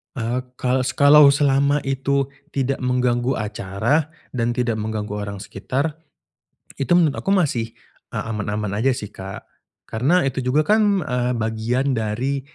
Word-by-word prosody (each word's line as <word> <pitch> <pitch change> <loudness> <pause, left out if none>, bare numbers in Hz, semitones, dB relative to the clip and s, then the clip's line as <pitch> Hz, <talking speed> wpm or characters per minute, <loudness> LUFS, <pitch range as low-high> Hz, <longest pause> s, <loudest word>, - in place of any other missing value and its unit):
Eee, 120 +1 -2 0.2
kalau 130 +1 +1
se 135 - -1
kalau 145 +2 +7
selama 140 0 +2
itu 135 0 0 0.2
tidak 135 0 -1
mengganggu 125 0 +1
acara, 105 +9 -1 0.2
dan 115 -1 0
tidak 120 -2 0
mengganggu 105 -1 -3
orang 100 -1 -5
sekitar, 130 +10 -3 0.9
itu 135 - -1
menurut 160 -5 +4
aku - - -8
masih, 140 - +1 0.4
eee, - - -3
aman-aman 105 -2 -3
aja, 110 +6 +1
sih, 105 -5 -7
Kak. 95 +1 -8 0.4
Karena 140 +10 +1
itu 135 -1 -1
juga 130 +5 +1
kan, 205 -2 +3
eee, 125 -3 0
bagian 115 +4 -1
dari 120 +4 -1
125 Hz, 145 wpm, -22 LUFS, 110-140 Hz, 0.9 s, kalau